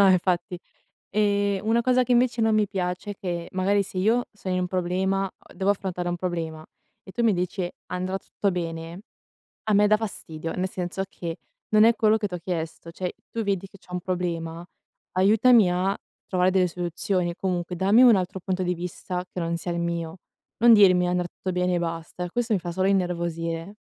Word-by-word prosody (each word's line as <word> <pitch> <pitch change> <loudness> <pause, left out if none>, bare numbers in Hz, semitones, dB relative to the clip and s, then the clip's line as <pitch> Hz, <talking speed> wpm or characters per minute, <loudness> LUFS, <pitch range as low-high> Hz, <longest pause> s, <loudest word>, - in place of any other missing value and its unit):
No 200 - +7
infatti. 180 0 +1 0.5
Ehm, 205 -1 +1
una 230 +2 +3
cosa 255 +1 +3
che 250 - -2
invece 240 -1 +2
non 220 -1 +3
mi 210 -1 +3
piace 180 0 -3
è - - -5
che, 175 -3 -4
magari 200 +2 +2
se 190 - -8
io 225 +6 +2
sono 190 -3 -4
in 185 - +1
un 180 - -1
problema 190 +2 0
a - - -19
devo 195 +1 0
affrontare 185 -3 -3
un 175 - -1
problema 165 -3 -4 0.4
e 190 - -11
tu 235 - -2
mi 225 -3 +4
dici: 180 0 -2 0.2
"Andrà 185 +1 -2
tutto 200 +1 -2
bene", 165 0 -5 0.6
a 215 - 0
me 205 +1 +5
dà 215 - +5
fastidio, 165 -7 -5
nel 185 0 -1
senso 180 +1 -3
che, 170 -3 -6 0.3
non 215 +1 +6
è 230 - +5
quello 220 -1 +4
che 210 -2 -2
t'ho 180 - -5
chiesto. 165 -1 -4
Cioè, 180 +1 -4 0.2
tu 230 - -2
vedi 195 -2 -1
che 195 - -16
c'ho 180 - -15
un 180 - -2
problema, 170 -2 -3 0.5
aiutami 210 +2 +5
a 185 +2 0 0.3
trovare 185 0 +2
delle 185 -1 +3
soluzioni, 175 +1 -1
comunque, 180 -1 -2
dammi 200 +6 +5
un 245 -3 +8
altro 185 +1 -3
punto 185 0 -1
di 180 - 0
vista 180 +1 -4
che 180 - -5
non 170 0 -1
sia 175 +1 -4
il 170 - -2
mio. 170 0 -3 0.4
Non 235 +1 +7
dirmi 185 -4 +6
"andrà 180 0 0
tutto 185 - -5
bene" 180 0 +1
e - - +1
basta; 170 +1 -4
questo 240 +4 -2
mi 195 - +2
fa 175 0 -5
solo 190 +2 +1
innervosire. 170 -1 -1
185 Hz, 200 wpm, -25 LUFS, 175-200 Hz, 0.6 s, un